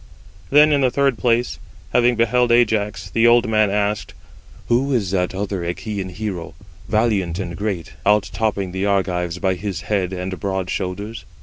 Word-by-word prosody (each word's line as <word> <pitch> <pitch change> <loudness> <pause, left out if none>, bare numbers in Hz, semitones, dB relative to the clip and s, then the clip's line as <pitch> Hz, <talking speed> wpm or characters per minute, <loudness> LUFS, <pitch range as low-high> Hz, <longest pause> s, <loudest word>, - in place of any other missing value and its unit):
Then 150 +1 +6
in 145 -1 +3
the 130 - +4
third 135 -2 +1
place, 120 0 +1 0.3
having 120 0 +4
beheld 120 +1 +2
Ajax, 110 -3 +2
the 115 +1 +3
old 120 0 +5
man 110 -2 +3
asked: 105 0 -1 0.5
"Who 130 +4 +2
is 100 -7 0
that 90 -1 0
other 100 0 -2
Achæan 95 +3 -4
hero, 90 -4 -5 0.3
valiant 105 -6 +1
and 85 -3 -4
great, 100 -5 -4
out 105 -1 +2
topping 100 -4 -1
the 95 +2 -1
Argives 90 -3 0
by 95 +1 +1
his 95 0 -4
head 95 -4 -1
and 95 0 -4
broad 95 -2 -2
shoulders?" 100 +4 -4
105 Hz, 165 wpm, -20 LUFS, 95-115 Hz, 0.5 s, Then